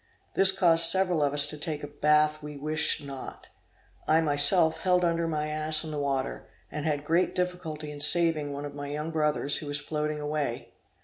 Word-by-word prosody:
This 195 0 +6
caused 165 -3 +5
several 185 -4 +1
of 145 -1 +1
us 145 0 +4
to 150 0 -5
take 150 -1 -5
a - - -5
bath 150 +1 +1
we 150 -1 -9
wished 155 +1 -1
not; 135 -2 -10 0.6
I 155 - +3
was 165 - +1
myself 155 +3 +4
held 180 -1 +1
under 170 0 -1
my 155 -2 -2
ass 155 +1 0
in 155 - -6
the 150 - -4
water, 135 -2 -3 0.2
and 150 +1 -5
had 145 -1 -2
great 175 +3 0
difficulty 180 -5 -4
in 145 - -10
saving 155 -1 +2
one 140 +1 -6
of 145 - -8
my 145 0 -7
young 150 +3 -5
brothers 150 -2 0
who 150 - -6
was 145 0 -1
floating 150 +1 -4
away. 150 -4 -4
150 Hz, 200 wpm, -27 LUFS, 145-165 Hz, 0.6 s, This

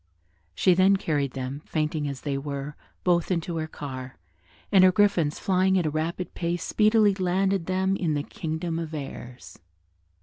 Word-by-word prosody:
She 185 - +4
then 190 +2 +4
carried 145 -7 -1
them, 135 +2 -5
fainting 155 -1 -1
as 140 -2 -5
they 140 -2 -2
were, 140 +1 -5 0.3
both 175 -2 +2
into 170 -2 -1
her 155 0 -2
car, 130 -4 -7 0.5
and 190 -2 +6
her 185 - +7
griffins 185 -7 +2
flying 190 0 +2
at 175 - +1
a 155 - 0
rapid 165 +4 -3
pace 170 0 -2
speedily 215 -1 +4
landed 190 -1 0
them 190 +1 +1
in 165 -5 0
the 145 - -1
Kingdom 165 +2 -4
of 160 -1 -5
Errors. 130 -3 -8
165 Hz, 165 wpm, -26 LUFS, 145-185 Hz, 0.5 s, her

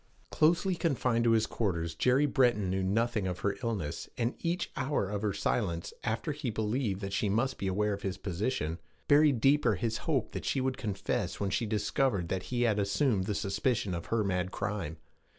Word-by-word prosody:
Closely 170 +4 +3
confined 125 -8 +1
to - - +5
his 110 -1 +3
quarters, 85 -9 -2
Jerry 125 - +3
Breton 120 -9 +2
knew 95 0 0
nothing 105 +1 +1
of 90 -1 -4
her 100 -1 0
illness, 95 -10 -3
and 120 +1 0
each 170 +1 -2
hour 135 -6 0
of 100 +1 -3
her 105 -2 +1
silence, 95 -3 -1
after 120 +7 -1
he 145 -3 -3
believed 110 -1 -1
that 100 -1 -4
she 100 +1 +1
must 120 +7 0
be 100 - -2
aware 105 +2 +1
of 100 - -5
his 95 -2 -3
position, 90 - -2 0.3
buried 145 -3 +5
deeper 140 +5 +4
his 115 -2 -2
hope - - +1
that - - -5
she - - 0
would 130 0 0
confess 105 -4 -2
when 100 -1 -1
she 115 - 0
discovered 105 -2 0
that 95 - -1
he 120 -1 +1
had 110 -3 +2
assumed 100 0 +1
the 105 - -1
suspicion 105 +1 0
of 85 -1 -5
her 115 -2 +1
mad 90 -2 0
crime. 100 -6 -3
105 Hz, 195 wpm, -31 LUFS, 95-125 Hz, 0.3 s, to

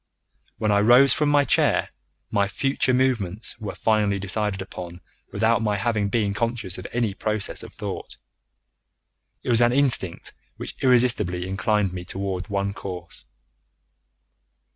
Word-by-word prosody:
When 110 - 0
I 100 - +4
rose 120 +5 +6
from 150 +3 +1
my 145 -1 +4
chair - - +2 0.4
my 100 -1 +2
future 130 +5 0
movements 120 -6 0
were 105 -3 -6
finally 105 -2 +1
decided 100 +1 -2
upon 90 -2 -8 0.3
without 115 +3 +2
my 105 -2 0
having 105 -2 0
been 105 -1 0
conscious 115 -4 -3
of 95 - -7
any 115 -4 0
process 110 +1 -2
of - - -10
thought. - - -7 1.3
It - - -5
was 120 -1 +4
an 120 0 +4
instinct 130 -10 +1 0.2
which - - -6
irresistibly 115 -8 +2
inclined 95 0 0
me 90 -1 -5
towards 95 -1 -4
one 100 0 -1
course. 90 -3 -8
105 Hz, 140 wpm, -24 LUFS, 95-120 Hz, 1.3 s, rose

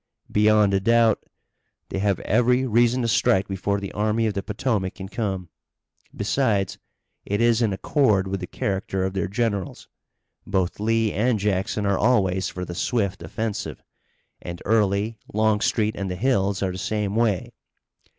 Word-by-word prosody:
"Beyond 105 -1 +4
a 95 - +3
doubt. 115 +1 +3 0.7
They 95 - -3
have 100 -1 +1
every 125 +4 +2
reason 120 +1 +3
to - - +1
strike 95 -3 +2
before 100 +1 -1
the 100 -1 -6
Army 110 +2 0
of 110 - 0
the 100 - -2
Potomac 105 -2 -2
can 95 -3 -7
come. 95 -4 -3 0.7
Besides, 105 -2 0 0.4
it 100 +1 -2
is 115 0 +3
in 110 -3 +2
accord 100 -2 +2
with 95 0 -2
the 90 - -6
character 95 -1 -2
of 95 0 -2
their 95 +1 -1
generals. 100 -2 -2 0.6
Both 95 -1 -1
Lee 115 0 +1
and 115 +3 +1
Jackson 100 +1 -1
are 100 -1 +1
always 95 -6 +2
for 90 0 -5
the 90 - -6
swift 100 0 -1
offensive, 100 - -4 0.6
and 85 0 -7
Early, 105 0 +1
Longstreet 110 0 +1
and 100 -1 -3
the 90 - -3
Hills 100 -3 +1
are 95 - 0
the 90 - -6
same 105 -1 -2
way. 110 -6 0
105 Hz, 160 wpm, -24 LUFS, 95-115 Hz, 0.7 s, Beyond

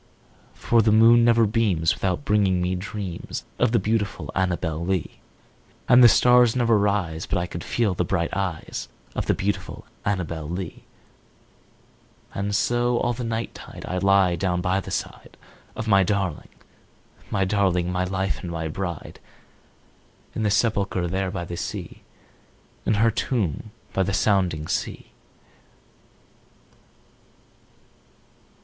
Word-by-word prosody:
For 115 -1 +2
the 110 0 +3
moon 115 +2 +6
never 115 -1 +5
beams 100 -7 +1
without 95 +9 -2
bringing 100 -5 +2
me 90 +1 0
dreams 95 -1 -5
Of - - +3
the 120 - +3
beautiful 100 -7 -1
Annabel 90 -3 -1
Lee; 90 -2 -2 0.7
And 125 0 +7
the - - +11
stars 125 -1 +5
never 120 -2 +3
rise 100 -6 0
but 90 - 0
I 90 - 0
feel 95 +5 -1
the 90 - 0
bright 85 -1 -1
eyes 95 -4 -4 0.2
Of - - -3
the - - +3
beautiful 100 +1 -3 0.2
Annabel 85 -6 -2
Lee; 90 -1 -6 1.5
And 100 +1 -2
so, 120 +3 +1
all 120 - 0
the 125 +1 -5
night 115 0 -3
tide, - - -10
I 90 - -2
lie 95 -2 +4
down 90 +1 -1
by 90 +2 +1
the 95 - -8
side - - -5 0.4
Of 115 - -5
my 100 -2 +5
darling 95 -4 -1 0.8
my 95 -2 +1
darling 95 -3 +1
my 90 0 0
life 95 -3 -2
and 90 - -6
my 80 -1 -3
bride, 85 -1 -5 1.1
In - - -3
the 105 - +2
sepulchre 100 -4 +1
there 95 +2 -1
by 90 -2 -4
the 85 - -6
sea, - - -6 0.9
In 110 - +3
her 115 +2 +3
tomb 110 - -2 0.2
by 95 - +1
the 95 +1 0
sounding 90 -8 +1
sea. - - -4
95 Hz, 140 wpm, -24 LUFS, 90-110 Hz, 1.5 s, the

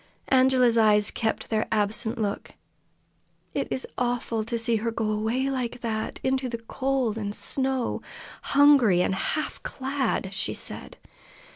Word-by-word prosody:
Angela's 255 -3 +4
eyes 210 -1 +6
kept 225 0 -3
their 220 0 0
absent 220 +1 0
look. 205 -2 -3 1.0
"It - - -2
was 260 - -2
awful 240 -2 -1
to 235 +1 -2
see 230 0 +1
her 225 +2 -2
go 220 -1 -2
away 225 +6 -1
like 250 -2 -3
that, 220 -2 -3
into 260 -1 0
the 235 - -4
cold 250 -1 -2
and 205 -1 -3
snow, 265 -2 -1 0.6
hungry 265 -11 +6
and - - 0
half 305 +10 -3
clad!" 265 -7 -2
she 195 - -2
said. - - -3
235 Hz, 140 wpm, -26 LUFS, 220-260 Hz, 1.0 s, eyes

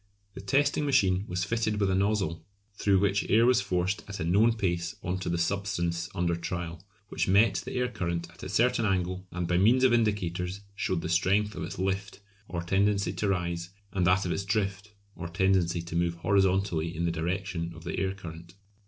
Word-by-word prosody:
The - - -8
testing 140 +9 +2
machine 100 -8 +3
was 90 0 -2
fitted 110 +1 -1
with 100 -2 +2
a - - +1
nozzle, 95 -4 0 0.3
through 100 -1 +2
which 100 +1 +1
air 115 +2 +5
was 125 -2 +4
forced 95 +1 -1
at 100 -1 -6
a - - -1
known 105 +8 +4
pace 90 -3 -2
on 90 +1 -2
to 90 - -3
the 85 - 0
substance 85 -2 -1
under 85 -1 +1
trial, 85 0 -5 0.3
which - - -1
met 100 +1 +4
the - - -6
air 125 0 +1
current 85 -7 -3
at - - -17
a 95 - -6
certain 115 +4 +2
angle 95 -2 -1
and 90 -1 -3
by 90 - +2
means 120 +7 +4
of 130 -2 +5
indicators 100 -4 0
showed 95 -3 -1
the 80 - -3
strength 100 +5 +2
of - - -6
its - - -5
"lift" 95 +1 -2 0.3
or 85 -1 -4
tendency 100 +2 +1
to 105 - -1
rise, 85 -2 -1 0.2
and 90 -2 +1
that 95 +1 +3
of 90 - -1
its 100 - -1
"drift" 100 0 -2 0.2
or 85 - -6
tendency 90 -1 +1
to 85 -1 -7
move 85 0 +1
horizontally 95 -3 +1
in 85 - 0
the 85 - +1
direction 85 0 -3
of 80 - -12
the - - -3
air 95 0 -1
current. 85 -1 -10
95 Hz, 205 wpm, -28 LUFS, 85-100 Hz, 0.3 s, air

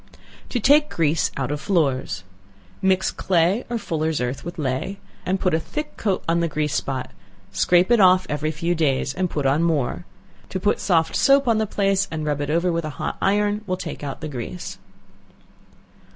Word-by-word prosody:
To 245 - -1
Take 295 +6 +5
Grease 160 -1 +1
out 135 0 -2
of 145 -1 -3
Floors. 135 - 0 0.6
Mix 190 0 +2
clay 185 +5 +1
or 240 - -1
fullers' 160 -6 -1
earth 125 +2 -3
with 175 - -7
ley, 140 +7 -2 0.3
and 190 +1 +1
put 185 -3 +1
a 160 - +3
thick 300 - -5
coat 195 -4 -1
on 170 +1 +2
the 170 - +1
grease 150 -2 -1
spot; 130 -2 -2 0.4
scrape 180 +4 +3
it 240 - +5
off 185 -1 +6
every 150 +1 -1
few 165 +3 -1
days, 140 -5 0
and 180 +2 -1
put 145 -4 -2
on 140 +4 +3
more. 165 0 0 0.4
To 190 - -3
put 205 +3 +1
soft 165 -4 +1
soap 275 -1 +4
on 225 -2 +3
the 220 - 0
place, 195 -1 +1
and 155 -1 -4
rub 145 -1 -1
it 145 - -3
over 170 +3 +2
with 170 -1 -1
a - - -3
hot - - -3
iron, 205 +1 +2
will 185 -1 -1
take 165 -4 -6
out 140 +1 -5
the 155 - -4
grease. 140 +5 -6
170 Hz, 195 wpm, -23 LUFS, 150-195 Hz, 0.6 s, off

